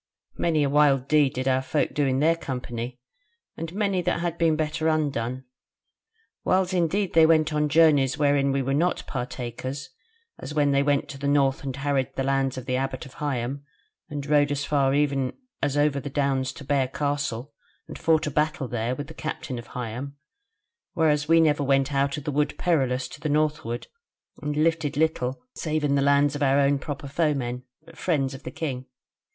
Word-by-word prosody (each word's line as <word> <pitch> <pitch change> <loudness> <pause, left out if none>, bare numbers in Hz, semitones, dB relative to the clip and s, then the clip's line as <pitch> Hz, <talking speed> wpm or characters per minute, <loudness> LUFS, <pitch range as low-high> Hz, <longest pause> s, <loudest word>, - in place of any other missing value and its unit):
Many 160 -3 +2
a - - +2
wild 140 -3 +4
deed 145 -2 +3
did 130 +1 -2
our 130 0 +3
folk 145 +3 0
in 135 -2 +2
their 165 +2 +4
company, 125 -4 -5 0.6
and 165 0 -5
many 200 -1 0
that 170 - 0
had 170 -1 -2
been 165 -2 +3
better 155 +1 -1
undone. 135 -5 -1 1.0
Whiles 185 0 +1
indeed 185 +3 +1
they 160 -1 +6
went 155 -1 +3
on 150 0 +1
journeys 145 -4 +4
wherein 140 -2 +2
we 135 0 0
were 135 +1 -1
not 170 +5 +1
partakers, 130 +2 -5 0.5
as 150 - -7
when 145 -2 +3
they 140 0 +3
went 140 0 +1
to 140 - -8
the 140 - -2
North 140 -1 +2
and 135 -2 -4
harried 135 -1 -1
the 135 - -1
lands 135 -1 0
of 130 - -6
the 130 -1 0
Abbot 130 -1 -3
of 130 - -13
Higham, 140 -1 -2 0.5
and 145 -2 -5
rode 145 -1 +3
as 140 0 -1
far 140 -2 +2
even 140 -3 +1 0.3
as 145 0 0
over 145 -1 +2
the 140 +1 -6
Downs 135 -2 0
to - - -10
Bear 135 -1 +1
Castle 140 -2 -2 0.3
and - - -8
fought 160 -1 +2
a 150 - -2
battle 150 -2 0
there 120 +1 -2
with 145 - -5
the 160 - -11
Captain 155 -4 -5
of 120 - -11
Higham: 125 +4 -5 0.8
whereas 150 -3 +2
we 165 +1 +5
went 150 -3 +3 0.3
never - - -3
out 140 +1 -2
of 150 - -6
the 150 - -2
Wood 150 +1 0
Perilous 130 -7 +1
to 145 - -11
the 155 - -2
northward; 150 -6 0 0.6
and 150 0 -3
lifted 160 -2 +1
little 150 - 0
save 155 -1 -2
in 145 -1 +2
the 140 - +2
lands 140 +1 +3
of 145 - -5
our 140 0 +4
own 140 0 +3
proper 145 +1 -6
foemen, 135 -5 -1 0.2
the - - -15
friends 140 -6 0
of 135 - -9
the - - -6
king. 130 -5 -4
145 Hz, 195 wpm, -25 LUFS, 135-155 Hz, 1.0 s, they